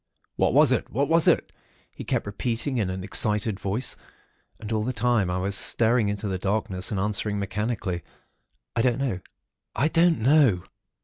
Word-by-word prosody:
'What - - +1
was - - +6
it? - - -1
What 140 +5 -1
was 165 0 +4
it?' - - +2 0.4
he - - -9
kept - - -2
repeating 120 +5 -3
in 100 -4 -1
an 95 0 -5
excited 105 +1 +1
voice. 100 +7 -1 0.6
And 110 0 -8
all 110 -1 0
the 125 - -2
time 115 -4 +1
I 90 - -2
was 95 +2 -1
staring 115 +1 +4
into 105 +1 -4
the 95 -2 -3
darkness 95 -1 -2
and 100 - -3
answering, 105 +1 -1
mechanically, 100 -2 -3 0.7
'I 115 - +1
don't 125 0 +1
know. 130 -9 -2 0.6
I 140 +8 +1
don't 165 0 +3
know.' 125 - +3
105 Hz, 175 wpm, -25 LUFS, 100-125 Hz, 0.7 s, was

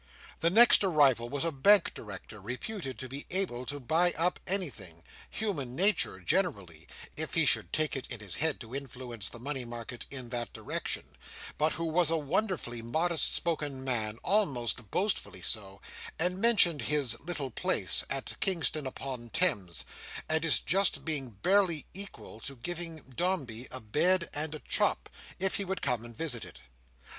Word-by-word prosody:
The 170 - +3
next 230 +3 +7
arrival 140 -10 +4
was 145 +4 -2
a 165 - +1
Bank 200 +9 +5
Director, 105 0 -9
reputed 130 - -5
to 130 - -6
be 135 +3 -6
able 175 -10 -2
to 145 +4 -3
buy 165 +7 +2
up 175 +3 0
anything—human 140 - -4
Nature 200 +6 +3
generally, 100 - 0 0.3
if - - -3
he - - +6
should 85 - +2
take 155 -1 0
it 135 - -5
in 120 - -3
his 100 -4 -1
head 160 -2 +1
to 115 0 -9
influence 125 -5 -5
the - - -8
money 135 +2 -3
market 120 0 -7
in 130 -3 -5
that 120 -1 -3
direction—but 155 +1 -4
who 165 - -3
was 165 0 +3
a 165 - +3
wonderfully 150 - -1
modest 160 +8 +2
spoken 145 -5 -1
man, 110 -4 -1
almost 125 - +1
boastfully 185 - -1
so, 100 -3 -1 0.4
and 180 +3 +1
mentioned 205 -10 +6
his 145 -6 0
"little 150 -5 -5
place" - - +2
at 135 -1 -2
Kingston 160 -6 0
upon 130 -3 -6
Thames, 105 - +1 0.4
and 160 0 +2
its 165 - +5
just 195 +1 +1
being 145 -5 -1
barely 175 - +2
equal 195 - -7
to 135 +4 -7
giving 165 +4 -5
Dombey 135 -10 -1
a 130 - -6
bed 170 - +2
and 155 +1 -2
a - - -7
chop, - - +1 0.3
if 190 +1 +2
he 200 - -1
would 190 0 -4
come 120 -2 0
and 120 -1 -10
visit 140 -8 -1
it. - - -11
145 Hz, 160 wpm, -30 LUFS, 120-175 Hz, 0.4 s, next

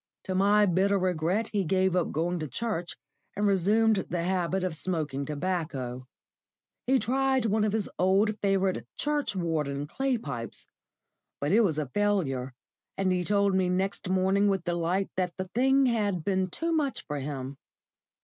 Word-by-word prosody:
To 190 - -3
my 205 +2 +4
bitter 195 +2 +2
regret 185 +3 0
he 200 -2 +1
gave 185 +1 +1
up 180 - +1
going 175 +3 -1
to 155 - -3
church, 180 - -3 0.4
and 205 +1 0
resumed 205 +3 +3
the 170 -1 -1
habit 185 +1 0
of 180 -3 -1
smoking 155 -5 -2
tobacco. 145 -6 -3 0.8
He 265 +1 +4
tried 265 0 +1
one 215 0 +2
of 215 - +1
his 215 -1 -1
old, 195 +4 +3
favourite 195 -2 +1
"churchwarden" 170 - -1
clay 265 - -1
pipes, 125 - -6 0.7
but 145 +2 -1
it 220 +4 +5
was 170 -9 +1
a 155 - 0
failure, 140 -6 0 0.5
and 195 -1 +1
he 180 -1 +1
told 200 +1 +2
me 190 -1 +2
next 190 +1 -1
morning 190 +2 +2
with 195 -3 +1
delight 175 +3 -1
that 180 -2 0
the 185 -1 -4
thing 265 +3 +4
had 205 -8 0
been 190 0 0
too 330 - -2
much 300 -4 -1
for 150 -1 -4
him. 135 -1 -5
185 Hz, 160 wpm, -28 LUFS, 165-205 Hz, 0.8 s, it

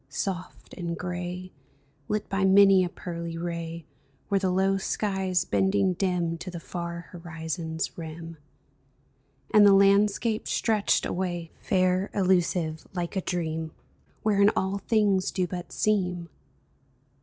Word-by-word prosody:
Soft 185 -2 -5
and 170 -2 -4
gray. 180 +1 -5 0.6
Lit 210 0 -1
by 195 0 -1
many 195 0 +6
a 180 - -1
pearly 170 -1 -6
ray, 170 -1 -5 0.5
Were 200 - +4
the 190 -1 0
low 190 +1 +2
skies 190 -2 0
bending 190 -1 +2
dim 175 -3 -1
To 185 - -6
the 175 -1 -6
far 170 -1 -6
horizon's 165 -1 -4
rim; 165 0 -7 1.2
And 210 - +8
the 200 -1 +8
landscape 205 +3 +3
stretched 215 -3 +1
away, 175 -2 -3
Fair, 185 +1 +1
illusive, 175 -4 +1
like 175 +1 -3
a 190 - 0
dream 160 -3 -3 0.5
Wherein 205 -1 +4
all 190 +1 0
things 200 -3 +2
do 185 -1 0
but 175 0 -6
seem 180 -5 0
180 Hz, 125 wpm, -27 LUFS, 170-195 Hz, 1.2 s, And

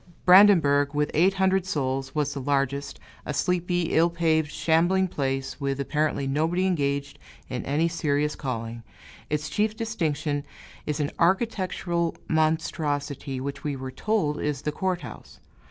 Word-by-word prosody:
Brandenburg, 165 -7 +6
with 150 0 +1
eight 185 +5 +3
hundred 190 0 +2
souls, 135 -5 -2
was 145 -1 0
the 140 - -5
largest 140 0 -1 0.2
a 150 - -4
sleepy, 175 +1 0
ill 165 +2 +4
paved, 160 -3 +1
shambling 175 +4 +2
place, 135 -3 -3
with 140 0 -1
apparently 150 0 0
nobody 160 +7 +1
engaged 140 -5 -1 0.3
in 125 - -3
any 150 +4 +2
serious 150 -3 0
calling; 115 -4 -4 0.5
its 150 0 -1
chief 215 +1 0
distinction 155 -10 -2 0.4
is 150 0 -1
an 145 -1 -1
architectural 180 -3 0
monstrosity, 150 -4 -1
which 140 +1 -5
we 145 -2 -2
were 130 0 -6
told 155 -1 -1
is 145 -2 -2
the 150 - -1
court 185 +2 -2
house. - - -11
150 Hz, 140 wpm, -26 LUFS, 140-175 Hz, 0.5 s, Brandenburg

